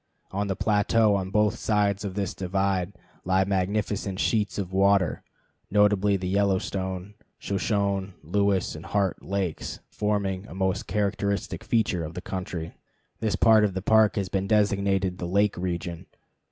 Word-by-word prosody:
On 100 Hz, +1 st, -1 dB
the 95 Hz, -, -1 dB
plateau 105 Hz, +1 st, +3 dB
on 95 Hz, -2 st, -1 dB
both 105 Hz, 0 st, +2 dB
sides 105 Hz, -2 st, +1 dB
of 95 Hz, -2 st, -4 dB
this 100 Hz, -2 st, -2 dB
divide 95 Hz, 0 st, -1 dB, 0.3 s
lie 95 Hz, +1 st, +2 dB
magnificent 100 Hz, 0 st, -1 dB
sheets 105 Hz, -3 st, 0 dB
of 95 Hz, -2 st, -4 dB
water, 95 Hz, -3 st, +3 dB, 0.5 s
notably 105 Hz, -1 st, +3 dB
the 90 Hz, -1 st, -4 dB
Yellowstone, 95 Hz, 0 st, -1 dB, 0.2 s
Shoshone, 100 Hz, -1 st, -1 dB
Lewis 100 Hz, +3 st, +1 dB
and 80 Hz, -, -9 dB
Heart 100 Hz, -3 st, 0 dB
lakes, 95 Hz, -4 st, -3 dB
forming 100 Hz, -2 st, -1 dB
a 85 Hz, -, -10 dB
most 95 Hz, -1 st, -1 dB
characteristic 100 Hz, 0 st, -1 dB
feature 110 Hz, -6 st, +1 dB
of 80 Hz, +1 st, -7 dB
the -, -, -3 dB
country. 90 Hz, -3 st, -5 dB, 0.5 s
This 110 Hz, -2 st, 0 dB
part 110 Hz, -2 st, +5 dB
of 100 Hz, -3 st, 0 dB
the 95 Hz, -, -3 dB
Park 110 Hz, 0 st, +4 dB
has 100 Hz, -2 st, -1 dB
been 95 Hz, +1 st, -1 dB
designated 100 Hz, -3 st, +1 dB
the 90 Hz, -, -3 dB
"lake 100 Hz, +3 st, +2 dB
region." 85 Hz, -1 st, -4 dB
100 Hz, 150 wpm, -26 LUFS, 95-105 Hz, 0.5 s, part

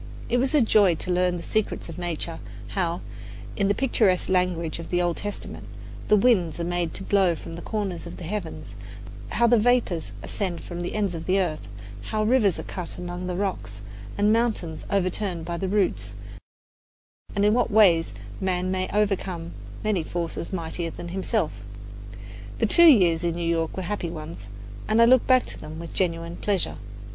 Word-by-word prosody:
It 245 Hz, -, +2 dB
was 260 Hz, +4 st, +1 dB
a 295 Hz, -, +6 dB
joy 205 Hz, -6 st, +5 dB
to 180 Hz, -, -3 dB
learn 180 Hz, 0 st, +2 dB
the 170 Hz, -, -7 dB
secrets 215 Hz, -1 st, -1 dB
of 165 Hz, +1 st, -8 dB
nature: 170 Hz, -1 st, -3 dB, 0.3 s
how 175 Hz, -2 st, -1 dB, 0.5 s
in 200 Hz, -, +1 dB
the 200 Hz, -, +2 dB
picturesque 215 Hz, -8 st, +2 dB
language 180 Hz, -3 st, 0 dB
of 165 Hz, -, -7 dB
the 175 Hz, -, +1 dB
Old 175 Hz, -1 st, 0 dB
Testament 205 Hz, 0 st, -6 dB, 0.4 s
the 210 Hz, -, +6 dB
winds 195 Hz, -8 st, +3 dB
are -, -, -1 dB
made 175 Hz, -1 st, -1 dB
to -, -, -4 dB
blow 190 Hz, -4 st, +3 dB
from 165 Hz, -, -9 dB
the 170 Hz, -, -7 dB
four -, -, -10 dB
corners 200 Hz, -5 st, -3 dB
of -, -, -8 dB
the -, -, -8 dB
heavens, 175 Hz, -1 st, -5 dB, 0.6 s
how 235 Hz, -, +2 dB
the 235 Hz, -1 st, +5 dB
vapours 225 Hz, -8 st, +1 dB
ascend 185 Hz, -4 st, -3 dB
from 175 Hz, -1 st, -6 dB
the 175 Hz, -, -4 dB
ends 200 Hz, -4 st, 0 dB
of 165 Hz, -1 st, -6 dB
the 190 Hz, +1 st, +3 dB
earth, 155 Hz, -, -2 dB, 0.4 s
how 215 Hz, 0 st, -1 dB
rivers 215 Hz, -5 st, +3 dB
are -, -, -5 dB
cut 180 Hz, -3 st, -6 dB
out -, -, -12 dB
among 180 Hz, 0 st, -5 dB
the 180 Hz, -, -2 dB
rocks, 140 Hz, -, -3 dB, 0.4 s
and 210 Hz, +1 st, +4 dB
mountains 220 Hz, -9 st, -1 dB
overturned 185 Hz, -3 st, -1 dB
by 170 Hz, 0 st, -3 dB
the 190 Hz, +2 st, -2 dB
roots, 175 Hz, -, 0 dB, 1.2 s
and 200 Hz, 0 st, +2 dB
in 210 Hz, -, +4 dB
what 245 Hz, 0 st, +2 dB
ways 185 Hz, -, +5 dB, 0.3 s
man 185 Hz, -1 st, 0 dB
may 185 Hz, 0 st, -1 dB
overcome 190 Hz, -5 st, -1 dB, 0.3 s
many 210 Hz, -5 st, +1 dB
forces 170 Hz, +1 st, -4 dB
mightier 170 Hz, -1 st, -3 dB
than 170 Hz, +1 st, -8 dB
himself. 190 Hz, 0 st, -1 dB, 1.1 s
The -, -, +2 dB
two 340 Hz, +10 st, +6 dB
years 175 Hz, -, +5 dB
in 170 Hz, -1 st, 0 dB
New 170 Hz, -1 st, -2 dB
York 165 Hz, 0 st, 0 dB
were 190 Hz, -, -2 dB
happy 180 Hz, -2 st, -3 dB
ones, 155 Hz, -10 st, -8 dB, 0.4 s
and 215 Hz, +1 st, +2 dB
I 230 Hz, -, +8 dB
look 255 Hz, +1 st, +5 dB
back 255 Hz, -1 st, +5 dB
to -, -, -8 dB
them 155 Hz, +1 st, -8 dB
with 165 Hz, 0 st, -8 dB
genuine 170 Hz, -2 st, -1 dB
pleasure. 200 Hz, -3 st, -1 dB
180 Hz, 190 wpm, -25 LUFS, 170-205 Hz, 1.2 s, I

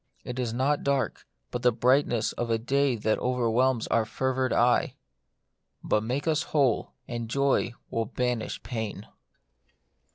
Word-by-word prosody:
It 125 Hz, +1 st, -5 dB
is 120 Hz, -3 st, -1 dB
not 135 Hz, +5 st, 0 dB
dark, 140 Hz, -1 st, -1 dB, 0.2 s
but -, -, -3 dB
the 125 Hz, -, +4 dB
brightness 120 Hz, -1 st, +2 dB
of 120 Hz, -, -3 dB
a 115 Hz, -, +2 dB
day 135 Hz, +3 st, +1 dB
that 110 Hz, -1 st, 0 dB
overwhelms 125 Hz, 0 st, +1 dB
our 115 Hz, -, +3 dB
fevered 130 Hz, +3 st, -1 dB
eye. 120 Hz, +1 st, +3 dB, 0.9 s
But 105 Hz, -, +1 dB
make 130 Hz, +7 st, -2 dB
us 155 Hz, -1 st, +2 dB
who 150 Hz, -2 st, +1 dB
ley -, -, -7 dB, 0.2 s
and 120 Hz, -1 st, -4 dB
joy 140 Hz, -2 st, +1 dB, 0.2 s
will 115 Hz, 0 st, 0 dB
banish 125 Hz, 0 st, -2 dB
pain. 110 Hz, -4 st, -4 dB
125 Hz, 150 wpm, -27 LUFS, 115-130 Hz, 0.9 s, the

